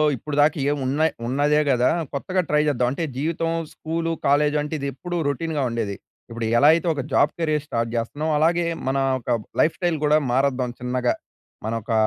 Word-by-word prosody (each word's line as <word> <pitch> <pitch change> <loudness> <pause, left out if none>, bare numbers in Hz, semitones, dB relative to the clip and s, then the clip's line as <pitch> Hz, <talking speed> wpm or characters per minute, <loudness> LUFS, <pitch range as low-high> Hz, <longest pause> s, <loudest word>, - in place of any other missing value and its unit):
ఇప్పడు 145 +5 -5
దాకా 150 +2 +3
ఏమి 145 0 0
ఉన్నాయ్ 150 +5 +2 0.2
ఉన్నదే 145 +4 +2
కదా 125 -1 +3 0.2
కొత్తగా 185 +7 0
ట్రై 150 0 +3
చేద్దాం. 125 -4 +1
అంటే 140 +5 -3
జీవితం 165 +3 -1 0.2
స్కూలు, 165 +1 -3 0.2
కాలేజ్ 145 +1 +3
అంటే 150 +1 -5
ఇది 140 - -3
ఎప్పుడు 175 +7 -5
రొటీన్‌గా 150 +2 -2
ఉండేది. 115 -4 -2 0.3
ఇప్పుడు 115 0 -4
ఎలా 145 +5 +6
అయితే 170 +2 0
ఒక 145 - -3
జాబ్ 140 - +4
కెరియర్ 155 -3 0
స్టార్ట్ 115 -4 -1
చేస్తున్నామో 145 +7 -2
అలాగే 170 +2 +2 0.2
మన 135 +1 +1 0.2
ఓక 120 0 0 0.3
లైఫ్ 155 - +2
స్టైల్ 175 -3 0
కూడా 150 +1 +5 0.2
మారద్దాం 130 -1 +1
చిన్నగా. 125 0 0 0.5
మన 110 - -2
ఒక 110 - -7
145 Hz, 180 wpm, -23 LUFS, 125-160 Hz, 0.5 s, ఎలా